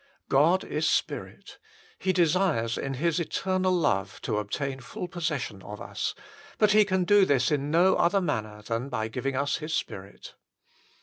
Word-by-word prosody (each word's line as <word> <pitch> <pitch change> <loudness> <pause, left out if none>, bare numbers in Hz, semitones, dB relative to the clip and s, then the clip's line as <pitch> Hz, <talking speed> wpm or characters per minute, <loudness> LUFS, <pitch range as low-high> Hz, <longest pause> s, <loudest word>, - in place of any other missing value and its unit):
God 160 +7 +4
is 155 +1 -1
spirit: - - -3 0.4
He 190 - +1
desires 170 -9 +2
in 135 0 -3
His 165 +4 0
eternal 185 +3 0
love 145 - 0
to 105 - 0
obtain 135 +6 -3
full 135 +7 -6
possession 155 - -3
of 105 +2 -9
us; - - -4 0.4
but 210 -1 +4
He 210 0 +6
can 190 -2 +1
do 205 +2 +5
this 140 -4 +2
in 145 -1 0
no 175 +4 +4
other 195 +4 +3
manner 110 - -3
than 115 +4 -3
by 110 -4 -2
giving 130 +3 -3
us 140 +2 0
His 155 0 -3
Spirit. 100 -8 -6
150 Hz, 165 wpm, -27 LUFS, 125-180 Hz, 0.4 s, He